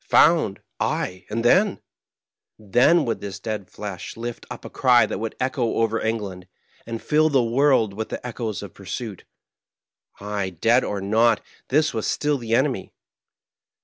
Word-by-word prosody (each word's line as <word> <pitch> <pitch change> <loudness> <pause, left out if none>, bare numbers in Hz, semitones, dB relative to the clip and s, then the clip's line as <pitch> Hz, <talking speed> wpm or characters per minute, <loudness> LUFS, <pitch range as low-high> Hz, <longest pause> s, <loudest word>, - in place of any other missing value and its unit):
Found 155 - +4 0.2
I - - +2 0.2
ay, 90 0 -16
and 115 +2 -2
then? 195 - +4 0.8
Then 125 - +3
would 115 - -2
this 100 -1 -6
dead 105 -3 -4
flesh 100 -2 -7
lift 120 +1 -6
up - - -8
a - - -6
cry 120 -3 +5
that 100 - -4
would 115 0 -4
echo 130 -3 0
over 115 0 +1
England, 100 -5 -3 0.4
and 115 -1 -4
fill 155 +4 +3
the 135 -4 +3
world 120 -3 +3
with 110 +2 -4
the - - -6
echoes 115 -4 -4
of 100 - -9
pursuit. 100 +1 -6 0.9
Ay, 100 -1 -3
dead 120 +6 +4
or 100 -1 -3
not, 115 +4 +3 0.3
this 155 +4 +2
was 110 -2 -2
still 150 -1 0
the 115 -1 0
enemy. 130 -5 0
115 Hz, 160 wpm, -23 LUFS, 105-125 Hz, 0.9 s, cry